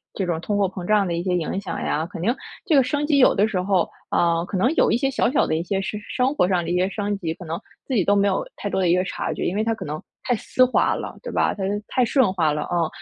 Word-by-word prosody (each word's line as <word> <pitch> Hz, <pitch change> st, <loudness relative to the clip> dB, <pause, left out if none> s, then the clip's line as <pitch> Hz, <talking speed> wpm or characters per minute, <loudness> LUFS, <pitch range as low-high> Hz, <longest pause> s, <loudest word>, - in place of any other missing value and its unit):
这 195 Hz, -, -1 dB
种 165 Hz, -2 st, -2 dB
通 205 Hz, +3 st, -1 dB
货 200 Hz, -, +3 dB
膨 185 Hz, -1 st, -7 dB
胀 210 Hz, -2 st, +3 dB
的 175 Hz, -, -2 dB
一 170 Hz, -, -1 dB
些 180 Hz, 0 st, 0 dB
影 180 Hz, +3 st, -2 dB
响 -, -, -5 dB
呀， 150 Hz, -, -1 dB
肯 -, -, -7 dB
定 225 Hz, +9 st, +1 dB, 0.3 s
这 335 Hz, -7 st, +3 dB
个 275 Hz, -, +7 dB
升 290 Hz, +3 st, -1 dB
级 290 Hz, -2 st, +3 dB
有 255 Hz, -, +6 dB
的 205 Hz, +2 st, +3 dB
时 190 Hz, -4 st, -1 dB
候， 185 Hz, -2 st, +1 dB, 0.2 s
啊， 170 Hz, 0 st, +2 dB
可 190 Hz, -, -3 dB
能 245 Hz, -, +2 dB
有 -, -, +3 dB
一 -, -, +3 dB
些 270 Hz, +2 st, 0 dB
小 255 Hz, -, +1 dB
小 280 Hz, -, +3 dB
的 155 Hz, -, 0 dB
一 165 Hz, -, 0 dB
些 195 Hz, +2 st, -1 dB
是 205 Hz, +2 st, -4 dB
生 255 Hz, +2 st, +1 dB
活 180 Hz, -, +2 dB
上 180 Hz, -2 st, +1 dB
的 170 Hz, -, -3 dB
一 -, -, +1 dB
些 185 Hz, +1 st, +2 dB
升 205 Hz, 0 st, -2 dB
级， 165 Hz, -4 st, -3 dB
可 175 Hz, -, -10 dB
能 165 Hz, +1 st, -4 dB, 0.3 s
自 265 Hz, -, -4 dB
己 205 Hz, -, +3 dB
都 200 Hz, +3 st, +3 dB
没 200 Hz, 0 st, +3 dB
有 -, -, 0 dB
太 -, -, -5 dB
多 190 Hz, -, 0 dB
的 180 Hz, -, +2 dB
一 175 Hz, -, +5 dB
个 180 Hz, -, +2 dB
察 185 Hz, -, -3 dB
觉， -, -, -3 dB
因 185 Hz, -, -1 dB
为 215 Hz, -, +1 dB
它 225 Hz, 0 st, +1 dB
可 -, -, -6 dB
能 150 Hz, +1 st, -5 dB, 0.2 s
太 245 Hz, -, +1 dB
丝 255 Hz, +3 st, +2 dB
滑 255 Hz, -, +3 dB
了， -, -, -6 dB
对 -, -, -6 dB
吧？ -, -, +2 dB
它 195 Hz, -, -4 dB, 0.2 s
太 255 Hz, -2 st, +2 dB
顺 245 Hz, -5 st, +3 dB
滑 160 Hz, -5 st, +2 dB
了， 150 Hz, -, -2 dB
啊。 170 Hz, -2 st, 0 dB
195 Hz, 335 characters per minute, -23 LUFS, 175-235 Hz, 0.3 s, 个